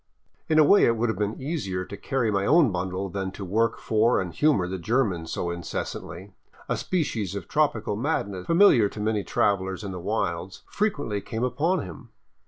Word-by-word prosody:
In 155 Hz, -, +3 dB
a 155 Hz, -, +8 dB
way 200 Hz, +7 st, +6 dB
it 115 Hz, -, +2 dB
would 115 Hz, +1 st, 0 dB
have 110 Hz, -, -2 dB
been 105 Hz, +1 st, -2 dB
easier 115 Hz, -, -3 dB
to 100 Hz, -, -8 dB
carry 115 Hz, +2 st, -1 dB
my 100 Hz, -1 st, +1 dB
own 150 Hz, +1 st, +4 dB
bundle 95 Hz, +1 st, -3 dB
than 95 Hz, 0 st, -3 dB
to 100 Hz, -, -7 dB
work 110 Hz, +5 st, +1 dB
for 115 Hz, +2 st, +2 dB
and 90 Hz, -3 st, -4 dB
humor 145 Hz, -12 st, +2 dB
the 95 Hz, 0 st, -4 dB
German 95 Hz, -4 st, 0 dB
so 85 Hz, +2 st, -3 dB
incessantly. 90 Hz, +2 st, -6 dB, 0.3 s
A -, -, 0 dB
species 115 Hz, -, -2 dB
of 100 Hz, -4 st, -6 dB
trop 150 Hz, -3 st, +2 dB
ical 110 Hz, -2 st, -3 dB
madness, 100 Hz, -, -2 dB
familiar 165 Hz, -, +5 dB
to 105 Hz, -, -9 dB
many 105 Hz, -1 st, 0 dB
travelers 95 Hz, 0 st, 0 dB
in 100 Hz, -, -5 dB
the 90 Hz, -, -6 dB
wilds, 95 Hz, -2 st, -3 dB
frequently 145 Hz, -, -2 dB
came 115 Hz, +3 st, -4 dB
upon 145 Hz, +8 st, 0 dB
him. 90 Hz, -4 st, -10 dB
105 Hz, 190 wpm, -25 LUFS, 95-125 Hz, 0.3 s, a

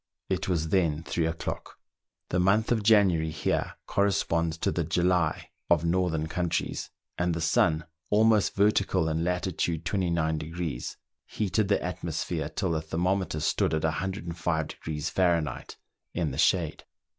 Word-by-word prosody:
It -, -, -1 dB
was 80 Hz, -3 st, 0 dB
then 80 Hz, -4 st, +1 dB
three 80 Hz, 0 st, 0 dB
o'clock. 80 Hz, 0 st, -5 dB, 0.5 s
The 90 Hz, -, +1 dB
month 100 Hz, +6 st, +3 dB
of 115 Hz, -2 st, +2 dB
January 100 Hz, -7 st, +4 dB
here 75 Hz, 0 st, -1 dB
corresponds 85 Hz, -5 st, +1 dB
to -, -, 0 dB
the 85 Hz, -, 0 dB
July 85 Hz, 0 st, +1 dB, 0.2 s
of 80 Hz, -, +3 dB
northern 85 Hz, -2 st, +1 dB
countries, 85 Hz, +1 st, -2 dB, 0.3 s
and 90 Hz, -1 st, +1 dB
the -, -, -2 dB
sun, 80 Hz, 0 st, +2 dB, 0.2 s
almost 110 Hz, 0 st, +4 dB
vertical 100 Hz, -4 st, +2 dB
in 80 Hz, +1 st, 0 dB
lat. 90 Hz, +1 st, 0 dB
29°, 85 Hz, -, -1 dB, 0.3 s
heated 105 Hz, 0 st, 0 dB
the 100 Hz, -, +3 dB
atmo 90 Hz, -2 st, -4 dB
sphere 80 Hz, -1 st, -2 dB
till 90 Hz, +2 st, -2 dB
the 80 Hz, -1 st, 0 dB
thermometer 85 Hz, +1 st, -1 dB
stood 75 Hz, +1 st, +1 dB
at 80 Hz, -, -2 dB
105° 80 Hz, -3 st, -2 dB
Fahrenheit 85 Hz, -7 st, 0 dB, 0.4 s
in 85 Hz, -4 st, 0 dB
the 65 Hz, -, -5 dB
shade. 85 Hz, -4 st, +2 dB
85 Hz, 135 wpm, -28 LUFS, 80-95 Hz, 0.5 s, January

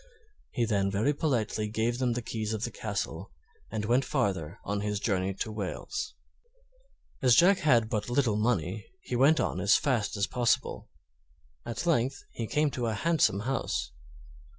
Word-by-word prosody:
He 120 Hz, -, 0 dB
then 100 Hz, -3 st, +1 dB
very 105 Hz, +9 st, +1 dB
politely 115 Hz, -8 st, 0 dB
gave 115 Hz, +3 st, -1 dB
them 125 Hz, -2 st, +1 dB
the 120 Hz, 0 st, -3 dB
keys 110 Hz, -1 st, -3 dB
of 110 Hz, -, -5 dB
the 120 Hz, -, -2 dB
castle 105 Hz, -2 st, -4 dB, 0.4 s
and 110 Hz, -2 st, -3 dB
went 120 Hz, +5 st, +3 dB
farther 100 Hz, -, -1 dB
on 100 Hz, 0 st, -2 dB
his 105 Hz, 0 st, -1 dB
journey 95 Hz, -2 st, 0 dB
to 110 Hz, -, -3 dB
Wales. 105 Hz, -, -4 dB, 1.1 s
As 125 Hz, -4 st, +5 dB
Jack 190 Hz, -, +6 dB
had 120 Hz, -7 st, +4 dB
but 105 Hz, 0 st, -2 dB
little 120 Hz, -4 st, +2 dB
money, 105 Hz, -3 st, -1 dB
he 125 Hz, -, -4 dB
went 140 Hz, +6 st, +5 dB
on -, -, -1 dB
as 100 Hz, +3 st, +4 dB
fast 120 Hz, -7 st, 0 dB
as 100 Hz, -, +2 dB
possible. 120 Hz, +1 st, 0 dB, 0.8 s
At 120 Hz, +7 st, -3 dB
length 135 Hz, -5 st, +1 dB
he 115 Hz, -, -4 dB
came 150 Hz, +3 st, +1 dB
to 120 Hz, -3 st, -2 dB
a 110 Hz, -, -1 dB
handsome 145 Hz, -, +2 dB
house. 115 Hz, -, -2 dB
115 Hz, 165 wpm, -29 LUFS, 105-130 Hz, 1.1 s, Jack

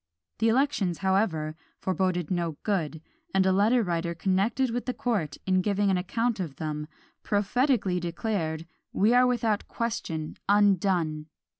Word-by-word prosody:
The 225 Hz, -, +3 dB
elections, 225 Hz, -, +1 dB
however, 170 Hz, -6 st, +1 dB, 0.2 s
foreboded 185 Hz, -3 st, -1 dB
no 170 Hz, -4 st, -1 dB
good; 160 Hz, -6 st, -1 dB, 0.3 s
and 190 Hz, -1 st, +4 dB
a 190 Hz, -, +4 dB
letter 220 Hz, +5 st, +3 dB
writer 170 Hz, -2 st, -2 dB
connected 205 Hz, +8 st, +1 dB
with 245 Hz, +2 st, -3 dB
the 250 Hz, -, -1 dB
court, 195 Hz, -, -1 dB
in 185 Hz, -1 st, +3 dB
giving 200 Hz, 0 st, +1 dB
an 185 Hz, -, +2 dB
account 230 Hz, +4 st, -1 dB
of 160 Hz, -7 st, -4 dB
them, 150 Hz, -1 st, -4 dB, 0.3 s
prophetically 205 Hz, -2 st, +1 dB
declared, 170 Hz, -2 st, -2 dB, 0.3 s
"we 215 Hz, +5 st, +3 dB
are 250 Hz, 0 st, +6 dB
without 225 Hz, -4 st, 0 dB
question 165 Hz, -9 st, -3 dB
undone!" 185 Hz, -6 st, +2 dB
190 Hz, 140 wpm, -27 LUFS, 170-225 Hz, 0.3 s, are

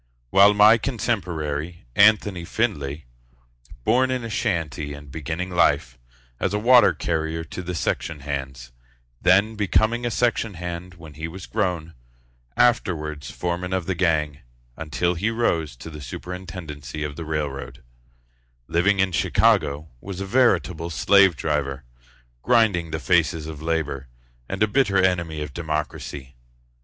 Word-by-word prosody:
While 100 Hz, +1 st, +6 dB
my 105 Hz, +3 st, +7 dB
contemporary, 85 Hz, -, -3 dB
Anthony 100 Hz, -3 st, +4 dB
Findlay, 75 Hz, -, -2 dB, 0.8 s
Born 130 Hz, +3 st, +3 dB
in 130 Hz, -2 st, -1 dB
a 115 Hz, -, -5 dB
shanty 80 Hz, -, -2 dB
and 70 Hz, -1 st, -12 dB
beginning 80 Hz, +5 st, -4 dB
life 65 Hz, -8 st, +2 dB, 0.4 s
As -, -, 0 dB
a -, -, +2 dB
water 120 Hz, -1 st, +6 dB
carrier 80 Hz, 0 st, -2 dB
to 80 Hz, +3 st, -7 dB
the 90 Hz, 0 st, -5 dB
section 80 Hz, -2 st, -2 dB
hands, 65 Hz, -3 st, -5 dB, 0.5 s
Then 100 Hz, +5 st, +4 dB
becoming 110 Hz, +3 st, +1 dB
a 120 Hz, -, 0 dB
section 115 Hz, -3 st, 0 dB
hand 90 Hz, +1 st, -6 dB
when 80 Hz, -3 st, -12 dB
he 80 Hz, +3 st, -5 dB
was 90 Hz, +3 st, -9 dB
grown, 85 Hz, -5 st, -2 dB, 0.6 s
Afterwards 75 Hz, -, +1 dB
foreman 90 Hz, +1 st, -3 dB
of 95 Hz, -2 st, -1 dB
the 95 Hz, -, -1 dB
gang, 80 Hz, -5 st, 0 dB, 0.4 s
until 80 Hz, +2 st, -1 dB
he 95 Hz, +6 st, -1 dB
rose 85 Hz, -, 0 dB
To 80 Hz, +7 st, -10 dB
the 75 Hz, -1 st, -9 dB
superintendency 75 Hz, -2 st, -7 dB
of 75 Hz, -1 st, -4 dB
the 85 Hz, -, -6 dB
railroad, 75 Hz, -3 st, -4 dB, 0.8 s
Living 95 Hz, +4 st, +2 dB
in 95 Hz, 0 st, +2 dB
Chicago, 75 Hz, -1 st, +2 dB
Was 95 Hz, +3 st, -7 dB
a 100 Hz, -, -3 dB
veritable 95 Hz, -7 st, +2 dB
slave 95 Hz, +1 st, +4 dB
driver, 70 Hz, -2 st, -2 dB, 0.6 s
Grinding 105 Hz, -, +3 dB
the 80 Hz, -, -3 dB
faces 80 Hz, +2 st, +1 dB
of 80 Hz, -1 st, -8 dB
labor, 75 Hz, -4 st, -2 dB, 0.4 s
And -, -, 0 dB
a -, -, +4 dB
bitter 105 Hz, -3 st, +2 dB
enemy 85 Hz, -5 st, +1 dB
of 75 Hz, -2 st, -8 dB
democracy. 75 Hz, -5 st, -5 dB
85 Hz, 140 wpm, -23 LUFS, 75-100 Hz, 0.8 s, my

